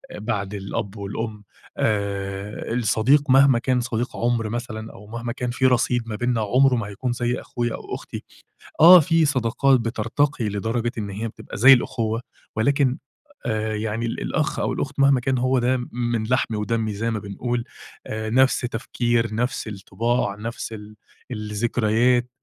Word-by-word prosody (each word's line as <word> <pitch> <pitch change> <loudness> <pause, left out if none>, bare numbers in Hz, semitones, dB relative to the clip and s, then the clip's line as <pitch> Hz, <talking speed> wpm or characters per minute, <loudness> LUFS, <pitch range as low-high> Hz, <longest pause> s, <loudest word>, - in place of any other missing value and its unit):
بعد 105 -2 -3
الأب 100 +1 -4
والأم 105 +1 -5 0.3
آآ، 100 0 -2
الصديق 125 +5 +2
مهما 135 -2 +6
كان 125 0 +1
صديق 120 +1 -3
عُمْر 115 -2 0
مثلًا، 110 -1 -5
أو 105 - -13
مهما 115 +2 -5
كان 125 -1 -3
في 130 +1 0
رصيد 125 -1 +2
ما 110 - -3
بيننا 120 0 0
عُمره 125 +5 +3
ما 110 -4 -2
هيكون 120 +5 -3
زي 120 +1 -1
أخويا 120 -1 -3
أو - - -6
أختي. - - -8 0.6
آه 180 +3 +10
في 165 0 +3
صداقات 130 -1 +2
بترتقي 115 +2 -1
لدرجة 115 +4 -1
إن 105 -2 -3
هي 105 +4 -4
بتبقى 110 - -9
زي 130 +5 +9
الأخوة 115 -3 0 0.3
ولكن 135 +3 +2 0.5
آآ 110 -1 -1
يعني 110 +2 -2
ال 115 - -4
الأخ - - -1
أو - - 0
الأخت - - -4
مهما 140 -1 +5
كان 130 +1 0
هو 130 +1 +2
ده 125 +2 +2
من 120 -2 -1
لحمي 120 -3 0
ودمّي 110 0 -1
زي 115 +3 -2
ما 110 - -2
بنقول 115 +4 -3 0.4
آآ، 110 0 -4
نفْس 130 +3 +4
تفكير، 120 -1 -1
نفْس 125 +1 -2
الطِّباع، 110 +1 -1
نفْس 115 +2 -6
ال 105 0 -10 0.4
الذكريات. 120 +2 +1
115 Hz, 160 wpm, -23 LUFS, 110-125 Hz, 0.6 s, آه